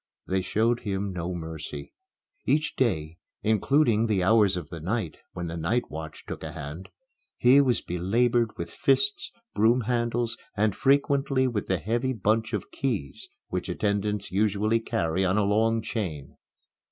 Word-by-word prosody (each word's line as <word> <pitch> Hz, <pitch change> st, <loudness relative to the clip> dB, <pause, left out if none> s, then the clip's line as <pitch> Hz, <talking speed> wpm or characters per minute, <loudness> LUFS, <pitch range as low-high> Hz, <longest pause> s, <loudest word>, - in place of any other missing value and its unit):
They 95 Hz, 0 st, 0 dB
showed 115 Hz, +5 st, +1 dB
him 100 Hz, -1 st, -3 dB
no 90 Hz, 0 st, -3 dB
mercy. 80 Hz, -3 st, -7 dB, 0.5 s
Each 155 Hz, +1 st, +1 dB
day 85 Hz, -10 st, 0 dB, 0.2 s
including 115 Hz, +1 st, +3 dB
the 100 Hz, -4 st, +1 dB
hours 100 Hz, -1 st, +4 dB
of 80 Hz, -4 st, -6 dB
the 85 Hz, -, -7 dB
night, 95 Hz, +1 st, -2 dB, 0.2 s
when 85 Hz, -, -4 dB
the 85 Hz, 0 st, -4 dB
night 85 Hz, +10 st, -1 dB
watch 80 Hz, 0 st, -7 dB
took -, -, -6 dB
a -, -, -6 dB
hand 80 Hz, +7 st, -7 dB, 0.5 s
he 130 Hz, +3 st, +6 dB
was 125 Hz, -4 st, +2 dB
belabored 115 Hz, +6 st, +1 dB
with -, -, -5 dB
fists, 410 Hz, 0 st, +1 dB, 0.2 s
broom 115 Hz, +4 st, +4 dB
handles, 120 Hz, 0 st, -1 dB, 0.2 s
and 105 Hz, -1 st, +2 dB
frequently 135 Hz, -1 st, +2 dB
with 110 Hz, -5 st, -2 dB
the 95 Hz, -, +1 dB
heavy 120 Hz, +9 st, -1 dB
bunch 110 Hz, +1 st, +1 dB
of 105 Hz, -5 st, -4 dB
keys 105 Hz, -, -3 dB, 0.2 s
which -, -, -3 dB
attendants 105 Hz, 0 st, -1 dB
usually 105 Hz, +3 st, +2 dB
carry 85 Hz, -4 st, -1 dB
on 95 Hz, +2 st, +2 dB
a 105 Hz, -, +3 dB
long 110 Hz, +2 st, +2 dB
chain. 80 Hz, -, -4 dB
105 Hz, 155 wpm, -27 LUFS, 90-120 Hz, 0.5 s, he